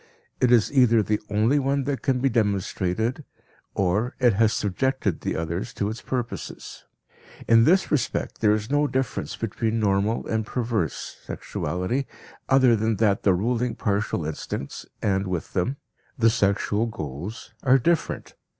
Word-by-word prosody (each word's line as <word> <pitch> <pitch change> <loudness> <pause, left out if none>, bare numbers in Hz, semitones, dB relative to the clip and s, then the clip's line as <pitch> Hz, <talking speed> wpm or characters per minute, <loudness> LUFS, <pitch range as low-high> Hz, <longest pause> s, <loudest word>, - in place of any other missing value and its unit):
It 125 - +3
is 120 +2 +4
either 115 -5 +5
the 105 +1 0
only 110 +8 +3
one 140 0 0
that 140 0 -2
can 130 -3 +1
be 135 - +3
demonstrated 110 - 0 0.5
or 100 +6 0
it 120 -4 +4
has 110 +2 +3
subjected 105 -1 -1
the - - -2
others 85 +3 -3
to 100 - -1
its 110 - -6
purposes. 125 -3 -5 0.6
In 115 0 +6
this 185 +5 +3
respect 130 -7 -1
there 105 -1 +5
is 110 +4 -4
no 145 0 +3
difference 130 -1 -2
between 115 0 -2
normal 105 +1 +1
and 110 0 -1
perverse 115 - -2
sexuality 105 +10 -3 0.4
other 130 -3 +5
than 110 +1 0
that 100 -1 +2
the 95 -3 +3
ruling 120 +4 0
partial 100 -5 -1
instincts, 75 -2 -5 0.2
and 95 -1 +1
with 90 -3 -4
them 120 +9 0 0.4
the 115 -3 +4
sexual 105 +1 +1
goals, 90 - -7
are 130 0 +5
different. 165 +5 -1
110 Hz, 150 wpm, -25 LUFS, 100-125 Hz, 0.6 s, In